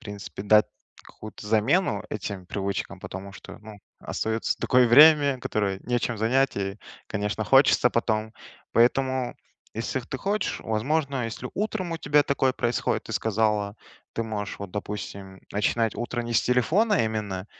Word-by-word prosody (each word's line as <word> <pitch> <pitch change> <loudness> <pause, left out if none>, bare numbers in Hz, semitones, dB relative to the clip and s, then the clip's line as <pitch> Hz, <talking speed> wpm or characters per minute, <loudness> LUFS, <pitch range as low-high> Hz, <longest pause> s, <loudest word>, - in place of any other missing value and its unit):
принципе 105 -3 -8
дать 105 +1 +5 0.4
какую-то 105 -1 -11
замену 110 - +2
этим 100 -3 -5
привычкам, 100 -1 -3
потому 95 +1 -8
что, - - -11
ну, 110 -1 -12 0.2
остается 110 0 -2
такое 125 -1 +4
время, 145 +1 +7
которое 100 -5 -1
нечем 120 -1 -1
занять, 125 +3 +1
и, 100 +1 -3 0.3
конечно, 105 +1 -2
хочется 135 +1 +5
потом. 110 -1 -1 0.4
Поэтому, 130 +1 +2 0.4
если 115 +4 -2
ты 125 +2 -6
хочешь, 205 +9 -2
возможно, 135 +3 -1
если 115 +2 -5
утром 200 -4 -2
у 165 - -3
тебя 145 -2 +3
такое 135 -2 +1
происходит, 120 0 -1
ты - - -7
сказала, 105 -1 0 0.4
ты 115 - -1
можешь, 105 -2 -5
вот 100 -2 -7
допустим, 100 -1 -6
м, - - -17
начинать 110 +2 +1
утро 120 0 -3
не 120 0 -5
с 110 - +4
телефона 165 - +2
именно, 105 -3 -3
110 Hz, 145 wpm, -25 LUFS, 105-130 Hz, 0.4 s, время